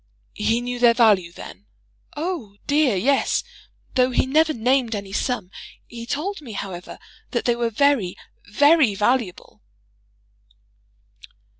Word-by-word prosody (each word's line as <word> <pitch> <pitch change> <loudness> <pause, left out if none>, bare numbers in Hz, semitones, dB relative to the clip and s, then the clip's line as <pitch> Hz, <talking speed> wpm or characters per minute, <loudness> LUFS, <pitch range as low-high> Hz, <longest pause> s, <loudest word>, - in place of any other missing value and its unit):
"He 230 +2 0
knew 245 0 -4
their 240 -1 +5
value, 205 -8 +4
then?" 100 - -12 0.5
"Oh, 300 - -4
dear, 290 -6 +2
yes. 265 +9 +1 0.5
Though 255 -1 +3
he 255 - +1
never 310 +4 +3
named 245 -2 +1
any 200 -1 -7
sum. 205 -6 -2 0.3
He 235 -1 -9
told 340 - -3
me, 240 -7 -9
however, 185 -3 -7 0.3
that - - -2
they 240 - +2
were 235 -1 -1
very 240 -6 +1 0.3
very 285 -1 +4
valuable." 215 -2 -1
240 Hz, 125 wpm, -22 LUFS, 205-280 Hz, 0.5 s, their